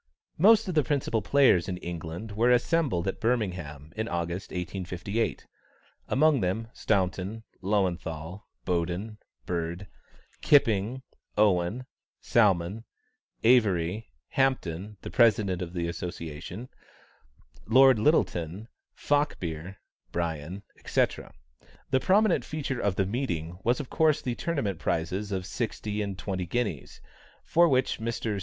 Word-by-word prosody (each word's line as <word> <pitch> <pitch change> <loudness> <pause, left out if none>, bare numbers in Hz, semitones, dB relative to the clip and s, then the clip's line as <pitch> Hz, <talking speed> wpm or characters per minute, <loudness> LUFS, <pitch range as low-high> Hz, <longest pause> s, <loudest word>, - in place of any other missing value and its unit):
Most 220 +4 +6
of 185 - -2
the 155 -2 +3
principal 130 -6 0
players 105 -7 +4
in 90 - -3
England 85 +4 -6
were 115 +4 +2
assembled 125 - +2
at 95 - -2
Birmingham, 90 - -2
in 110 +1 -2
August, 85 0 -3
1858. 90 +4 -3 0.6
Amongst 150 -2 +3
them, 95 +5 -1
Staunton, 95 +2 -1 0.2
Löwenthal, 90 -3 -1 0.2
Boden, 90 +5 -2 0.3
Bird, 85 +2 -3 0.6
Kipping, 130 -4 +3 0.3
Owen, 105 +3 +2 0.3
Salmon, 100 -1 +2 0.6
Avery, 110 -4 +3 0.2
Hampton, 105 -7 -1
the - - -7
President 105 -6 +3
of 85 -1 -4
the 85 -1 -2
Association, 85 +5 -6 1.0
Lord 130 +1 +6
Lyttelton, 105 - +1 0.3
Falkbeer, 95 - -1 0.4
Brien, 85 +3 -3 0.2
etc. - - 0 0.6
The 130 - +4
prominent 195 - +3
feature 140 -4 -3
of 100 -2 +1
the 95 - +1
meeting 90 - -3
was 120 +4 +2
of 145 - -6
course 155 -2 +3
the 125 - -1
tournament 120 - -2
prizes 95 +6 -2
of 95 -2 -2
sixty 105 0 -3
and 100 -2 -3
twenty 95 -3 -3
guineas, 100 - -3 0.4
for 170 0 +4
which 130 -3 +1
Messrs. 110 -2 -2
100 Hz, 115 wpm, -28 LUFS, 90-125 Hz, 1.0 s, Most